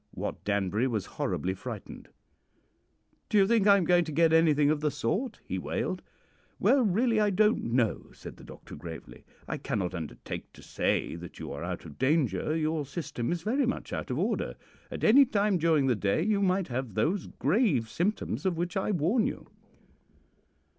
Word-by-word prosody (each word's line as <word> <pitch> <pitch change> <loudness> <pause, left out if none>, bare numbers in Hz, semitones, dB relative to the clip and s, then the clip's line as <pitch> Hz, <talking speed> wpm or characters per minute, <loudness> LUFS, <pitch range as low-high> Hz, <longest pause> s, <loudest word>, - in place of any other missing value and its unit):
Wat - - -5
Danbury 100 +4 0
was 110 -7 -2
horribly 95 - -2
frightened. 105 +2 -8 1.2
"'Do 215 - +2
you 195 - +6
think 215 -1 +3
I 200 -1 +8
am 190 - +1
going 175 0 +4
to 155 - -5
get 160 +1 +3
anything 150 -3 +4
of 155 - 0
the 150 - +2
sort?' 210 - -2
he - - -3
wailed. - - -3 0.6
"'Well, 275 - +4
really, 225 +2 +2
I 210 -1 +3
don't 210 +3 +2
know,' 115 -2 0
said - - -11
the - - -14
doctor - - -11
gravely. 80 -2 -9 0.2
'I - - -3
cannot 95 -3 -2
undertake 80 -4 -6
to - - -15
say - - -1
that 85 0 -10
you - - -6
are 70 - -6
out 90 0 -5
of 75 -3 -12
danger. 130 - +1
Your 155 -1 0
system 135 -3 -4
is 170 -1 -2
very 250 +5 +1
much - - -3
out - - -4
of - - -2
order. - - -1 0.3
At - - -6
any 265 +6 +7
time 205 -7 +1
during 160 -3 +3
the 125 -2 +2
day 100 +9 0
you 205 0 +1
might 190 -2 +1
have 125 -4 -4
those 165 - 0
grave 150 - +1
symptoms 185 - -2
of 185 -3 0
which 175 0 -2
I 190 - 0
warn 205 - +2
you.' - - -7
160 Hz, 185 wpm, -29 LUFS, -, 1.2 s, I